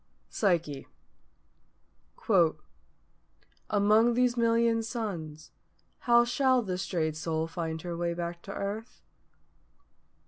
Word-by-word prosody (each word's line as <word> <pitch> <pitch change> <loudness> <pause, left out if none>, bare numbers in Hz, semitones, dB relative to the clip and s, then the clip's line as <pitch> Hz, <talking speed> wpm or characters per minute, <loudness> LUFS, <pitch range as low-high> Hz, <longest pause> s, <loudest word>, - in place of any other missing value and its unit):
PSYCHE. 165 -8 0 2.8
"_Among 215 +3 +4
these 250 0 +2
million 230 -1 +2
Suns 195 -10 -5 0.5
how 240 0 +4
shall 255 0 +2
the 185 -3 -3
strayed 165 -4 -1
Soul 160 0 -2
find 165 -1 -5
her 175 -1 -4
way 170 0 -2
back 170 0 -5
to 195 - -9
earth? 205 +4 -6
195 Hz, 95 wpm, -29 LUFS, 165-230 Hz, 2.8 s, Among